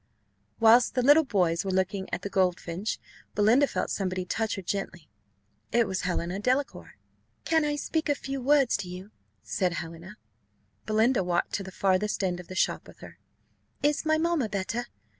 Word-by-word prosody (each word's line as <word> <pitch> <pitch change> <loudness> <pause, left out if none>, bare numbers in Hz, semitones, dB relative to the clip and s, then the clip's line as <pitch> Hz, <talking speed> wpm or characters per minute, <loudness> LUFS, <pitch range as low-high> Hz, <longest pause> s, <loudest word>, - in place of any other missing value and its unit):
Whilst 230 +3 +5
the 250 - +2
little 290 +5 +7
boys 180 -8 +1
were 195 - -3
looking 190 +1 -1
at - - -3
the 200 - -3
goldfinch, 185 +1 -1 0.4
Belinda 230 +7 +4
felt - - -2
somebody 185 -2 -2
touch 220 +4 -1
her 195 - -6
gently: 175 -3 -4 0.6
it 235 -1 +3
was 190 -1 -2
Helena 180 +1 -2
Delacour. 255 +6 -1 0.5
"Can 320 -1 +3
I 295 0 0
speak 315 +2 -2
a 290 - +3
few 270 -1 -5
words 275 -1 +3
to 195 -4 -6
you?" 185 +3 -9 0.3
said 180 -3 -1
Helena. 170 +4 -7 0.7
Belinda 220 +1 +3
walked 175 -1 -1
to - - -1
the 190 - -9
farthest 195 +2 0
end 180 -2 -1
of 180 - -10
the 185 - -8
shop - - 0
with - - -15
her. - - -12 0.6
"Is 295 0 +2
my 315 0 +2
mamma 320 -7 0
better?" 205 +4 -3
205 Hz, 175 wpm, -27 LUFS, 185-255 Hz, 0.7 s, little